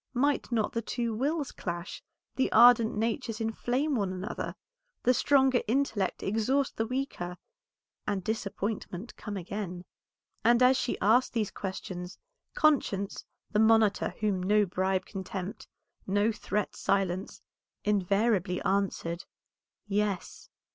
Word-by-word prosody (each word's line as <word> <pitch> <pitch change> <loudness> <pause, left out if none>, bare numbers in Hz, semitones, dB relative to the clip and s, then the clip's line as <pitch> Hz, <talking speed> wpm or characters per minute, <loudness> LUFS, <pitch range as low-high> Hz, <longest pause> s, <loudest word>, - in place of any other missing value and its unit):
Might 280 +1 +1
not 220 -3 0
the 230 - -1
two 235 0 -2
wills 285 +5 -1
clash, 170 +1 -5 0.3
the 265 - +1
ardent 235 -1 +6
natures 225 +1 -1
inflame 245 +6 -1
one 200 -5 0
another, 185 +4 -4 0.5
the 250 - +5
stronger 265 -1 +4
intellect 225 -6 0
exhaust 240 +7 +1
the 225 - 0
weaker, 240 -9 -3 0.7
and 200 -3 -1
disappointment 210 -1 -3
come 205 -2 -6
again? 185 -1 -5 0.6
And 235 +2 +5
as 255 +1 +6
she 250 - -1
asked 230 +6 +4
these 220 -4 0
questions, 185 -1 -6 0.4
conscience, 210 -10 +1 0.3
the 210 - +2
monitor 220 -2 +4
whom 200 -4 +1
no 210 +3 +3
bribe 190 +1 0
can 195 -1 -6
tempt, 185 +1 -6 0.4
no 205 +3 +2
threat 210 -2 -2
silence, 195 -1 -1 0.4
invariably 200 -1 +1
answered 190 -3 -1 0.6
"Yes." 205 -2 -2
210 Hz, 120 wpm, -29 LUFS, 190-240 Hz, 0.7 s, ardent